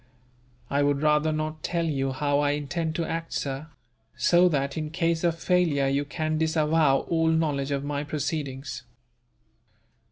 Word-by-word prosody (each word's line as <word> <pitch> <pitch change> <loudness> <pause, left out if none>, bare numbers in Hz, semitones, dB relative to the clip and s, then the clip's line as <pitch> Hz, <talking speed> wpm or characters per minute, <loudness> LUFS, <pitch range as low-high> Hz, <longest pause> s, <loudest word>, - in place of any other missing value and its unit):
"I 140 +1 +1
would 145 0 +1
rather 150 +1 +3
not 155 0 -3
tell 170 -1 -1
you 135 -4 -1
how 145 +2 0
I 145 0 +2
intend 160 +2 -3
to 170 -2 -1
act, 165 +1 -4
sir; 140 +2 -3 0.5
so 175 +1 +5
that, 140 -3 -1
in 155 -1 -3
case 165 0 0
of 170 -1 +1
failure, 165 -6 +2
you 140 +1 0
can 155 +2 -2
disavow 155 -3 +3
all 165 -1 0
knowledge 150 -4 +1
of 140 -1 -1
my 145 0 -2
proceedings." 145 -3 -4
155 Hz, 155 wpm, -26 LUFS, 140-160 Hz, 0.5 s, so